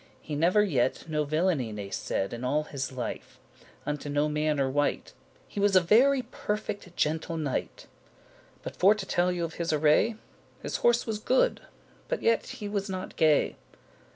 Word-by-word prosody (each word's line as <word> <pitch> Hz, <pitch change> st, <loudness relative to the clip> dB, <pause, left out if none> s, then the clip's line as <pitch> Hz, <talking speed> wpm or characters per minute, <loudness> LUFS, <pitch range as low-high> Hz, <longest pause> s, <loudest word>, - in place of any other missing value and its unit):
He 155 Hz, -, -8 dB
never 175 Hz, +8 st, +3 dB
yet 130 Hz, -7 st, 0 dB
no 150 Hz, -1 st, -1 dB
villainy 155 Hz, -5 st, 0 dB
ne 100 Hz, -2 st, -6 dB
said 95 Hz, -, -2 dB
In 120 Hz, +1 st, -6 dB
all 145 Hz, +4 st, +1 dB
his 135 Hz, -3 st, -5 dB
life, 130 Hz, -2 st, -6 dB, 0.5 s
unto 150 Hz, 0 st, -3 dB
no 145 Hz, +1 st, +1 dB
manner 150 Hz, -2 st, 0 dB
wight. 145 Hz, +2 st, -1 dB, 0.3 s
He -, -, -6 dB
was 200 Hz, -1 st, +3 dB
a -, -, +9 dB
very 250 Hz, +9 st, +4 dB
perfect 210 Hz, -5 st, -5 dB
gentle 160 Hz, +2 st, 0 dB
knight. 150 Hz, -4 st, -3 dB, 0.8 s
But -, -, -6 dB
for 200 Hz, +4 st, +5 dB
to 205 Hz, -2 st, -5 dB
telle 180 Hz, 0 st, +1 dB
you 175 Hz, -1 st, -1 dB
of 165 Hz, -, -7 dB
his 170 Hz, -, 0 dB
array, 155 Hz, +9 st, +3 dB, 0.5 s
His -, -, -2 dB
horse 240 Hz, 0 st, +3 dB
was 220 Hz, -2 st, -3 dB
good, 255 Hz, +4 st, +2 dB, 0.5 s
but -, -, -3 dB
yet 230 Hz, -, +2 dB
he 210 Hz, -, -6 dB
was 200 Hz, -1 st, -2 dB
not 185 Hz, -1 st, -5 dB
gay. 155 Hz, -2 st, +3 dB
160 Hz, 170 wpm, -28 LUFS, 145-205 Hz, 0.8 s, a